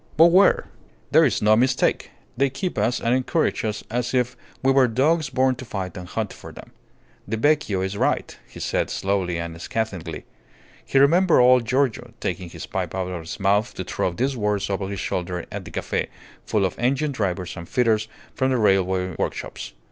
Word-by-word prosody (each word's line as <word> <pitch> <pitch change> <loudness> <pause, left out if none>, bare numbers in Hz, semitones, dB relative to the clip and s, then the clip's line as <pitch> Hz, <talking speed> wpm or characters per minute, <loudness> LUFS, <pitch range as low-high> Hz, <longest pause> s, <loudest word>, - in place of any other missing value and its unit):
But 165 +2 +7
where? 190 +3 +5 0.5
"There - - +6
is - - 0
no 105 +1 +6
mistake. 130 +3 +1 0.3
They 135 +2 +2
keep 175 +7 -4
us 120 +1 +1
and 115 - +1
encourage 130 +5 0
us 105 -1 -3
as 125 +2 -1
if 125 0 +1 0.3
we 135 - +4
were 135 -1 +5
dogs 140 +6 +1
born 130 0 +2
to 130 - -7
fight 95 -5 -5
and 90 -1 -7
hunt 110 +2 -3
for - - -11
them. - - -13 0.6
The 110 +3 -2
vecchio 145 -8 +2
is 95 +1 -2
right," - - 0
he - - -12
said, - - -1
slowly 95 -3 -1
and 85 0 -6
scathingly. 90 -6 -4 0.6
He - - -1
remembered 165 +3 +5
old 125 -1 +5
Giorgio 125 -1 0
taking 90 -1 -3
his - - -8
pipe - - -4
out 95 -1 -2
of 90 - -4
his 80 - -7
mouth 100 +3 +1
to 95 - -4
throw 90 - -1
these 130 +9 -1
words 105 -3 -1
over 95 0 -2
his 100 -1 -4
shoulder 90 -1 -3
at - - -6
the - - -8
cafe, - - -2 0.4
full 105 -3 +2
of 95 - -4
engine 140 +5 +1
drivers 95 -7 -2
and 85 -2 -9
fitters 110 -3 +2 0.3
from 130 -1 0
the 130 - +2
railway 95 -4 +2
workshops. - - -4
110 Hz, 195 wpm, -23 LUFS, 95-130 Hz, 0.6 s, But